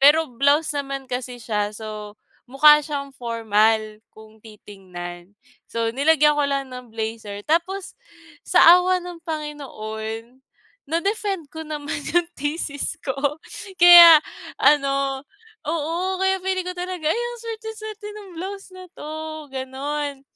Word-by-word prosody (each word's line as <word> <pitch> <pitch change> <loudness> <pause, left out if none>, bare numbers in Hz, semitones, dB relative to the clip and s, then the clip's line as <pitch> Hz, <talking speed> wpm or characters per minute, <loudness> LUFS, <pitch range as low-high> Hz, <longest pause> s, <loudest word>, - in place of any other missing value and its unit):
Pero 300 +3 +5
blouse 285 +5 +2
naman 275 -1 -4
kasi 250 0 -4
siya, 210 -2 -1
so 215 -1 -8 0.3
mukha 300 +4 +7
siyang 285 -2 -5
formal 220 -3 0 0.2
kung 220 0 -16
titingnan. 190 -4 -11 0.3
So, 230 0 -2
nilagyan 295 +3 +3
ko 290 - +2
lang 275 -2 -2
ng 250 -3 -10
blazer. 220 -2 -5
Tapos, 360 - -2 0.5
sa - - +5 0.2
awa 365 0 +1
ng 355 -1 -8
Panginoon 245 -6 -6 0.5
na-defend 380 +1 -2
ko 320 0 -8
naman 300 -1 -4 0.2
'yung 345 -1 +2
thesis 290 0 -3
ko 265 - -2 0.6
kaya 345 -3 +10 0.4
ano 275 -2 +3 0.5
oo, 335 +4 -1
kaya 380 0 +2
feeling 375 0 -2
ko 365 - -5
talaga, 355 -3 -2
"Ay, 455 - 0
ang 480 0 -4
suwerte-suwerte 440 -2 -7
ng 420 -2 -10
blouse 390 +3 -6
na 370 0 -11
'to," 300 - -8 0.4
gano'n. 270 +2 -4
290 Hz, 125 wpm, -22 LUFS, 230-345 Hz, 0.6 s, kaya